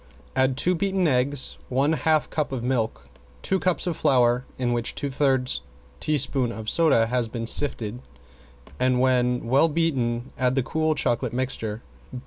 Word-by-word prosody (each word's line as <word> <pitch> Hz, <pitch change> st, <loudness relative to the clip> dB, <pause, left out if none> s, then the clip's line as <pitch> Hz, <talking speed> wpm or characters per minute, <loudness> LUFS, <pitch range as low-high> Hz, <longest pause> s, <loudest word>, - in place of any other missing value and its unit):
Add 130 Hz, 0 st, +2 dB
two 180 Hz, +5 st, +2 dB
beaten 190 Hz, 0 st, 0 dB
eggs, 135 Hz, 0 st, -1 dB
one 135 Hz, +5 st, +2 dB
half 155 Hz, +1 st, +1 dB
cup 150 Hz, -3 st, -2 dB
of 130 Hz, -3 st, -4 dB
milk, 110 Hz, -, -2 dB, 0.4 s
two 190 Hz, -, 0 dB
cups 180 Hz, -1 st, 0 dB
of 175 Hz, -3 st, -1 dB
flour 125 Hz, -2 st, +2 dB
in 120 Hz, -2 st, 0 dB
which 120 Hz, 0 st, -2 dB
two 140 Hz, -2 st, -3 dB
thirds 130 Hz, -2 st, +1 dB, 0.4 s
teaspoon 135 Hz, -4 st, +1 dB
of 110 Hz, -2 st, -4 dB
soda 160 Hz, -9 st, +4 dB
has 120 Hz, 0 st, 0 dB
been 115 Hz, 0 st, -5 dB
sifted, 120 Hz, -2 st, 0 dB, 0.8 s
and 125 Hz, -1 st, +2 dB
when 125 Hz, -1 st, +1 dB
well 135 Hz, +7 st, +4 dB
beaten 130 Hz, -7 st, -1 dB
add 130 Hz, 0 st, +2 dB
the 135 Hz, -, +1 dB
cool 155 Hz, +3 st, 0 dB
chocolate 120 Hz, -4 st, -1 dB
mixture. 120 Hz, -4 st, -3 dB
130 Hz, 155 wpm, -24 LUFS, 120-150 Hz, 0.8 s, soda